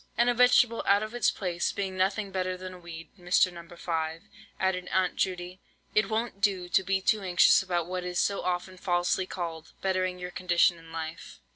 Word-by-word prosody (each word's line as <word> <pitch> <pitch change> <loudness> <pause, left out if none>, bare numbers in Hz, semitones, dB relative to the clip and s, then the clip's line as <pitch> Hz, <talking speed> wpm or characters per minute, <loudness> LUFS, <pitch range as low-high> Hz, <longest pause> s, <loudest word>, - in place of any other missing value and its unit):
"And 240 +1 +4
a - - 0
vegetable 245 -1 +4
out 200 +1 +4
of 215 +1 -6
its 240 - +2
place 175 -3 -2
being 195 -2 -3
nothing 195 +2 0
better 185 -1 -2
than 185 0 -8
a 180 - -11
weed, 165 -1 -10
Mr. 180 +1 +3
No. 170 0 -11
5," 165 -1 -3 0.4
added 185 -1 0
Aunt 185 -1 +1
Judy, 180 0 -2 0.3
"it 210 -1 +2
won't 220 -2 -2
do 195 -4 +1
to 185 - +4
be 190 0 0
too 215 +2 +2
anxious 180 -2 +5
about 175 -3 -1
what 180 +1 -4
is 180 -1 -2
so 200 - +1
often 180 +1 -3
falsely 180 0 0
called, 165 -3 -6
bettering 185 -1 0
your 180 0 -6
condition 175 -1 +2
in 165 0 -15
life. 160 -1 -7
185 Hz, 195 wpm, -28 LUFS, 175-195 Hz, 0.4 s, anxious